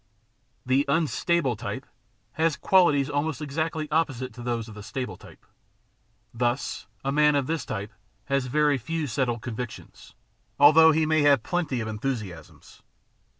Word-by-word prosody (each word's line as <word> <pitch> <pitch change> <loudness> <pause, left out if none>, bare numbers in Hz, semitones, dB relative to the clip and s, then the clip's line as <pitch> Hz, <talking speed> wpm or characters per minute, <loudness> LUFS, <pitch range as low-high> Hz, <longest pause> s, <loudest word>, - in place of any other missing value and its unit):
The 130 +2 +3
unstable 160 -2 +1
type 125 +4 -6 0.5
has 160 -1 +1
qualities 150 -8 +4
almost 145 0 -2
exactly 155 +1 -3
opposite 140 -5 -1
to 125 - -10
those 120 -2 -3
of 110 - -10
the 105 - -9
stable 125 +4 -5
type. - - -16 0.9
Thus, 120 +2 -2 0.2
a 135 - +1
man 150 +1 +4
of 140 -2 +1
this 160 +2 -2
type 105 0 -4 0.3
has 140 -2 0
very 150 +1 +2
few 160 +6 -3
settled 120 -2 -1
convictions, 120 0 -8 0.4
although 160 +3 +8
he 160 0 +2
may 155 0 +2
have 140 -5 +4
plenty 165 -9 -1
of 110 - -4
enthusiasms. 105 -6 -6
140 Hz, 145 wpm, -26 LUFS, 120-155 Hz, 0.9 s, although